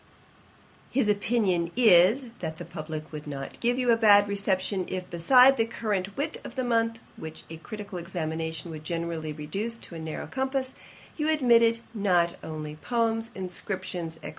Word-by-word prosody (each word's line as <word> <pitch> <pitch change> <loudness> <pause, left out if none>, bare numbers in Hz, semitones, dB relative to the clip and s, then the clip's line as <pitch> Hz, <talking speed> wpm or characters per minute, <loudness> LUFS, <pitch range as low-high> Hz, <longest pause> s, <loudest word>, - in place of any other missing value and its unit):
'His 255 -4 +1
opinion 205 -5 +1
is, 220 +2 +6
that 160 -2 -4
the - - -8
publick 155 -2 -7
would 150 -1 -7
not 135 -2 -6
give 240 +1 +1
you 250 -2 +3
a - - +6
bad 205 -3 +6
reception, 195 -1 0
if, 185 -1 -4
beside 250 +10 +6
the 225 - +3
current 205 -4 -3
wit 300 +3 -3
of - - -9
the 260 - -1
month, 230 -1 +1 0.2
which 160 0 -8
a 160 - -6
critical 205 +1 -7
examination 160 -1 -4
would 155 -1 -8
generally 165 -1 -3
reduce 195 +11 -3
to 185 - -12
a 165 - -6
narrow 160 -1 -5
compass, 265 0 -1 0.4
you 305 0 0
admitted 235 -6 +4
not 180 -5 +2
only 155 -1 -6
poems, 230 +3 0
inscriptions, 180 -2 -4
&c. - - -5
195 Hz, 165 wpm, -27 LUFS, 165-230 Hz, 0.4 s, is